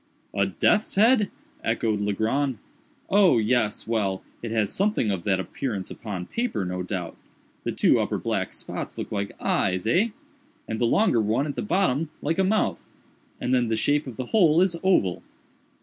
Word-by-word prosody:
"A 100 -1 +1
death's 205 - +1
head!" 215 0 +4 0.3
echoed 110 -2 0
Legrand. 115 +6 0 0.5
"Oh—yes—well, 115 - +2 0.2
it 115 - -4
has 110 -2 0
something 200 - +1
of 95 -4 -3
that 95 -2 +2
appearance 100 -1 -4
upon 100 -5 -5
paper, 230 - -2
no 90 0 -3
doubt. 90 -2 -4 0.5
The - - 0
two - - +3
upper - - -1
black - - -2
spots - - -6
look - - -5
like 100 -1 -4
eyes, 95 0 0
eh? 180 - +3 0.6
and 110 - -3
the - - +4
longer 125 - +3
one 110 +6 +1
at 145 - -4
the - - -2
bottom 170 -6 +1
like 160 +5 -1
a - - +4
mouth—and 190 -9 -3
then 125 -2 +3
the 110 - 0
shape 145 +5 +1
of 125 - -8
the 130 - -3
whole 170 -7 +5
is 185 -1 +3
oval." 140 - +2
115 Hz, 165 wpm, -25 LUFS, -, 0.6 s, whole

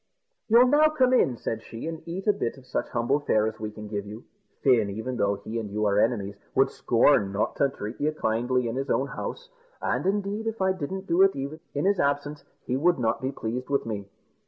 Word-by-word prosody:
"You'll 235 +3 +7
now 295 +4 +5
come 260 -4 +2
in," 130 - +3
said 115 0 -3
she, 115 +2 -8
"and 165 -1 -5
eat 180 +3 -5
a 210 - +4
bit 120 -5 -3
of 130 - -15
such - - -3
humble 120 +4 +1
fare 110 -7 +2
as 110 0 -4
we 110 0 -3
can 105 0 -9
give 105 -1 -4
you. 110 +3 -9 0.4
Fin, 120 -6 +4
even 110 +5 -4
although 100 0 0
he 115 +2 -3
and 105 -2 -5
you 105 +1 -1
are 100 0 +3
enemies, 105 -4 +1 0.2
would - - +4
scorn 100 -1 +3
not 100 +2 -1
to 140 - +3
treat 110 -2 -7
you 150 +1 +2
kindly 125 -2 0
in 115 +2 -3
his 135 +1 -3
own 135 +4 +1
house; 485 - -6 0.3
and, - - -1
indeed, 205 +2 -1
if 225 0 -3
I 190 0 +2
didn't 190 +3 -5
do 175 0 +2
it 195 0 +5
even 140 +3 -5 0.2
in 145 - 0
his 200 -1 +2
absence, 145 +1 0 0.2
he 125 - -1
would 175 +6 +3
not 115 -3 0
be 130 +1 -1
pleased 125 0 -4
with 140 -1 +1
me." 105 -3 -4
130 Hz, 230 wpm, -26 LUFS, 110-175 Hz, 0.4 s, You'll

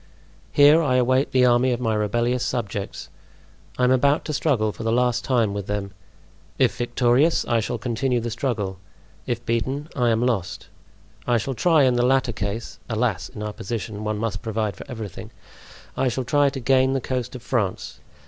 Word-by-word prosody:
Here 145 +3 +6
I 135 -5 +1
await 130 +2 +2
the 130 -1 +4
army 125 +1 +3
of 120 - -1
my 115 -3 0
rebellious 120 +4 0
subjects. 110 -6 -4 0.7
I 125 - 0
am 125 - +4
about 140 +3 +3
to 155 - -3
struggle 125 -8 +1
for - - -10
the 115 0 0
last 125 0 +1
time 115 -6 +1
with 100 -1 -5
them. 100 -1 -3 0.7
If - - +2
victorious, 120 +6 +2
I 120 -2 +1
shall 115 +2 -2
continue 120 +2 -1
the 115 0 -4
struggle; 110 -6 -2 0.5
if 120 0 -3
beaten, 130 +6 -2
I 125 -4 +2
am 115 +1 +2
lost. 105 -8 -2 0.6
I 120 -1 +3
shall 120 +4 -2
try, 160 +4 +3
in 125 -2 +3
the 120 - +2
latter 130 -1 +2
case 105 +3 -5
(alas! 110 -6 -1
in 105 - -8
our 105 0 -4
position, 105 0 -5
one 110 0 -2
must 105 -3 -3
provide 110 -3 -2
for - - -11
everything), 110 -7 -7 0.7
I 135 - +1
shall 125 +1 -1
try 145 +2 +3
to 135 0 -6
gain 130 +1 +3
the 135 - +1
coast 125 0 -3
of 125 - -9
France. 105 -7 -2
120 Hz, 185 wpm, -23 LUFS, 110-130 Hz, 0.7 s, Here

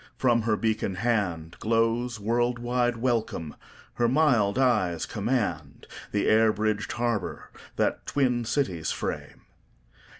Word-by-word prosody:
From 120 -3 +3
her 110 -1 +1
beacon 110 -3 -1
handGlows 115 +4 0
world 120 +3 +1
wide 120 0 0
welcome; 115 - -1 0.4
her 120 - +1
mild 120 -7 +3
eyes 105 -11 +2
commandThe 105 - -3
air 110 0 +5
bridged 105 0 -1
harbour 120 -5 -2 0.2
that - - -1
twin 125 -4 +1
cities 95 - -1
frame. - - -4
115 Hz, 105 wpm, -27 LUFS, 105-120 Hz, 0.4 s, air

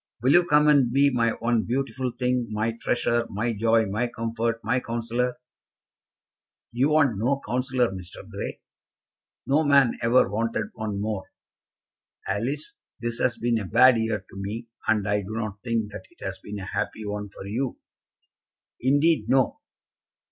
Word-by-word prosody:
Will 130 - +4
you 175 +2 +6
come 150 -1 +5
and 140 -5 +5
be 140 +2 +4
my 115 -2 +2
one 115 0 0
beautiful 130 +2 -2
thing, 125 0 -1
my 110 +1 0
treasure, 120 -1 +1
my 115 +4 -1
joy, 115 +1 +3
my 105 +5 -1
comfort, 115 0 -2
my 125 +3 +1
counsellor?" 120 +1 -2 1.3
"You 130 +5 +2
want 145 -9 +3
no 135 +5 +1
counsellor, 125 -2 +1
Mr. 90 -2 -9
Grey." - - -6 0.8
"No 145 +4 +3
man 140 -4 +4
ever 120 +2 +4
wanted 115 +3 -2
one 110 -3 -4
more. 105 -2 -3 1.0
Alice, 135 +8 -3 0.2
this 120 0 -3
has 120 -2 +1
been 115 -1 +1
a 105 - -4
bad 120 +4 +6
year 110 -3 -1
to - - -16
me, 110 +4 -5 0.2
and 105 -3 +2
I 105 0 +1
do 100 +2 -7
not 110 -3 -4
think 115 -3 -1
that 95 - -8
it - - -12
has 95 -1 -4
been 105 +2 -7
a 95 - -6
happy 110 +3 -3
one 105 0 -4
for 95 - -10
you." 120 +6 -2 1.0
"Indeed, 140 -2 +3
no." 130 0 +3
115 Hz, 160 wpm, -25 LUFS, 110-130 Hz, 1.3 s, you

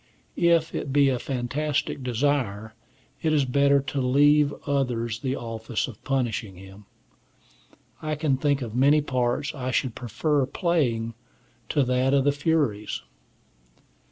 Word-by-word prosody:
If 170 -2 +2
it 140 - -3
be 140 0 +4
a 125 -2 0
fantastic 135 +3 -2
desire, 120 -4 -1 0.5
it 160 - +1
is 145 -3 +3
better 140 +2 +3
to 140 0 -3
leave 145 +3 +4
to - - -8
others 120 -5 -1
the 130 -1 -2
office 115 -1 -3
of 115 -5 -11
punishing 115 -7 -2
him. 95 +2 -13 1.2
I 155 0 -2
can 150 -3 0
think 140 0 +1
of 115 -3 -6
many 140 +5 +4
parts 130 -1 -1
I 130 -3 -4
should 130 -1 0
prefer 135 +4 -1
playing 125 -10 0 0.6
to 145 - +2
that 130 +2 +2
of 135 - +3
the 145 - +3
Furies. 145 -8 -1
135 Hz, 140 wpm, -25 LUFS, 120-145 Hz, 1.2 s, be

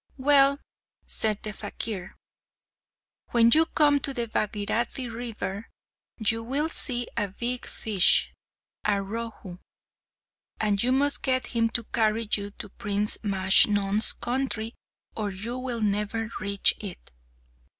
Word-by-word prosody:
"Well," 280 0 +4 0.5
said 215 -2 0
the 215 - -3
fakir, 200 -2 -5 1.1
"when 235 -1 +4
you 320 +1 +5
come 290 -2 +3
to 275 0 -1
the 235 - -1
Bhagirathi 220 +4 -2
river 225 -3 -5 0.5
you 225 0 0
will 275 +7 -1
see 245 -6 -1
a 205 - 0
big 240 +6 -4
fish, 200 -5 +3 0.5
a 210 - +2
Rohu; 200 -2 -5 1.0
and 205 -2 +1
you 250 - +1
must 280 +2 +1
get 260 -1 +1
him 230 0 +2
to 240 - -8
carry 220 0 0
you 200 -1 -1
to 205 0 -7
Prince 210 0 -1
Majnun's 200 +1 +4
country, 240 -3 -2 0.4
or 210 -2 -2
you 215 +6 -6
will 250 -3 -4
never 210 +2 -1
reach 200 -1 +3
it." 195 -5 -8
225 Hz, 125 wpm, -26 LUFS, 205-245 Hz, 1.1 s, you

